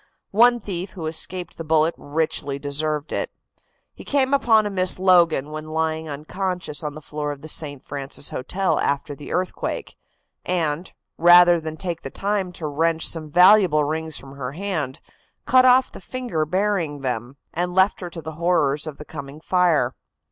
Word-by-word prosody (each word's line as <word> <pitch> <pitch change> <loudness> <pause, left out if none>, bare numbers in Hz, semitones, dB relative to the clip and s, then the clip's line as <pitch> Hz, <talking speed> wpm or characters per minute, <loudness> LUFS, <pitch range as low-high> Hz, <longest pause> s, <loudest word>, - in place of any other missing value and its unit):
One 240 +3 +5
thief 185 -3 -5
who 170 -4 -6
escaped 170 +3 -3
the - - -3
bullet 160 +1 +2
richly 145 -2 -2
deserved 150 +1 -3
it. - - -1 0.6
He - - -12
came 275 -1 +1
upon 225 -6 +4
a 205 - -2
Miss 185 -1 +2
Logan 170 -6 +4
when 155 0 -6
lying 160 0 -1
unconscious 165 +1 -4
on 150 -1 -4
the 155 - -10
floor 150 0 -4
of 145 0 -9
the - - -7
St. 145 -3 -3
Francis 140 0 -4
Hotel 185 +9 -1
after 145 +1 -1
the 145 +1 -10
earthquake, 180 0 -3 0.5
and, 170 -1 -1 0.3
rather 175 0 +7
than 160 0 -6
take 170 -2 -4
the - - -6
time 195 +2 -2
to 165 - -6
wrench 160 +2 +1
some 155 -2 -1
valuable 180 -2 +6
rings 160 +1 -3
from 135 - -11
her 130 -1 -5
hand, 160 -7 -3 0.5
cut 255 0 +5
off 255 +1 +5
the - - -11
finger 240 -12 -3
bearing 180 -5 0
them, 125 0 -3 0.2
and 175 +1 -2
left 190 +2 +3
her 180 - -5
to 170 -2 -9
the 160 - -5
horrors 150 -4 +1
of 150 - -6
the 150 - -10
coming 140 -1 -8
fire. 160 -8 +2
160 Hz, 175 wpm, -23 LUFS, 150-185 Hz, 0.6 s, rather